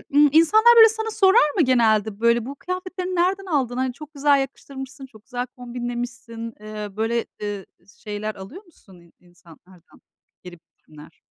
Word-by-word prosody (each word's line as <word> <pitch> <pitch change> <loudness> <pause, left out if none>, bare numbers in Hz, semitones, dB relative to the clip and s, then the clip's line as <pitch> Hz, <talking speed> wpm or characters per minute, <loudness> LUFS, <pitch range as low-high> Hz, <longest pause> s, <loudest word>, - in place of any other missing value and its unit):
ımm, 295 0 +6
insanlar, 435 +10 +6
böyle, 450 -1 +9
sana 445 0 -4
sorar 385 -5 +4
mı - - +4
genelde 220 -5 +2
böyle, 235 0 +2
bu 275 - -7
kıyafetlerini 365 +2 -5
nereden 380 +3 0
aldın, 260 -8 -1
hani 260 -1 -1
çok 300 +2 -12
güzel 285 0 +3
yakıştırmışsın, 270 +1 -7
çok 220 -5 -18
güzel 245 -1 -4
kombinlemişsin? 240 -1 -6
Eee, 215 -1 -7
böyle, 230 +1 -1 0.2
ııı, 205 -2 -5 0.4
şeyler 215 0 -5
alıyor 270 - -11
musun 220 - -20
in 170 -1 -22
insanlardan, 175 0 -20 0.4
geri 175 -2 -11
bildirimler? 155 0 -18
245 Hz, 155 wpm, -22 LUFS, 215-310 Hz, 0.4 s, böyle